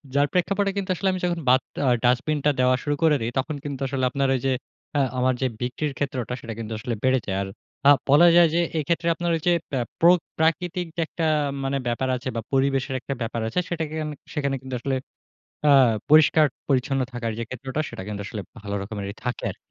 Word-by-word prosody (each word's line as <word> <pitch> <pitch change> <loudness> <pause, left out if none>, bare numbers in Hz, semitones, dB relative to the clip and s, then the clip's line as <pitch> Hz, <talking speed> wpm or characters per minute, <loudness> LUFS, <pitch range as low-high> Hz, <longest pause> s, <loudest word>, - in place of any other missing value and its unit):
যার 145 +1 +4
প্রেক্ষাপটে 195 +2 +1
কিন্তু 195 -1 -2
আসলে 190 +2 0
আমি 185 - -2
যখন 175 -1 -1
বাত 130 +1 +5 0.3
আ - - +5
ডাস্টবিনটা 145 +4 +2
দেওয়া 130 0 +4
শুরু 145 0 0
করে 155 -2 +5
দেই, 115 +2 -2
তখন 150 +3 -2
কিন্তু 140 -2 -5
আসলে 130 -1 -1
আপনার 140 +1 0
ওই 130 - -1
যে, 135 - +2 0.5
আ - - +4 0.2
আমার 130 +1 +2
যে, 130 - +2
বিক্রির 135 +4 -2
ক্ষেত্রটা 130 -4 -2
সেটা 115 -1 -6
কিন্তু 110 0 -5
আসলে 120 +2 -3
বেড়ে 130 0 +3
যায়। 95 -1 -2
আর 100 - -3 0.4
আ - - +9 0.2
বলা 150 +5 +7
যায় 175 -1 +7
যে, - - +3 0.2
এইক্ষেত্রে 165 +3 0
আপনার 175 0 -1
ওই 160 - -3
যে, 175 - +6 0.5
প্রোক 175 +1 +6 0.2
প্রাকৃতিক 175 +2 +1
যে, 170 - -1
একটা 165 - -3 0.4
মানে 135 +1 0
ব্যাপার 120 +2 -1
আছে 125 - -6
বা 115 - -1
পরিবেশের 135 0 +1
একটা 140 - -4
ব্যাপার 115 0 -2
আছে 115 - -1
সেটাকে 160 -3 -3
আমি, 150 -1 -5 0.2
সেখানে 140 -2 -1
কিন্তু 130 -1 -5
আসলে 135 +2 -1 0.7
আ - - +7 0.4
পরিষ্কার-পরিচ্ছন্ন 140 -3 +3
থাকার 115 -2 -3
যে, - - -2
ক্ষেত্রটা 130 +3 -4
সেটা - - -7
কিন্তু 100 -1 -4
আসলে 105 - -5 0.2
ভালো 100 -1 -5
রকমেরই 100 -1 -5
থাকে 125 0 -3
আর - - -9
135 Hz, 205 wpm, -24 LUFS, 125-160 Hz, 0.7 s, আ